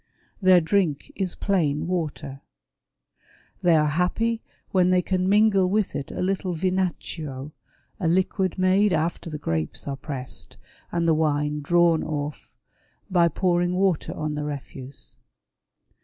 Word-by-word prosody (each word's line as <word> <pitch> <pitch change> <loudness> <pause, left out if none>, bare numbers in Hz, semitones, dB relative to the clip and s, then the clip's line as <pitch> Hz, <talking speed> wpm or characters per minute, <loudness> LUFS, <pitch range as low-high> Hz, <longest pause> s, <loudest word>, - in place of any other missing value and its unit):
Their 185 -2 +6
drink 165 -4 0
is 190 -3 -2
plain 160 -8 0
water. 155 -6 -3 1.2
They 175 -2 +4
are 155 -1 +4
happy 180 +9 0 0.3
when 185 -1 +3
they 180 -1 +3
can 185 0 0
mingle 200 -2 +4
with 210 0 0
it 140 - -4
a - - -3
little 185 -1 -1
vinaccio, 160 -6 -2 0.5
a 180 - 0
liquid 185 +1 +1
made 190 +2 +3
after 165 +1 -1
the 155 - -5
grapes 80 - -3
are 140 - -2
pressed, 135 -2 -4 0.3
and 170 -1 0
the 165 - +5
wine 150 -1 0
drawn 170 +2 +3
ofi", 145 -1 -4 0.6
by 175 -2 +5
pouring 175 +1 +1
water 185 -4 +1
on 155 -1 -2
the 150 0 -3
refuse. 140 -2 -8
170 Hz, 135 wpm, -24 LUFS, 150-185 Hz, 1.2 s, Their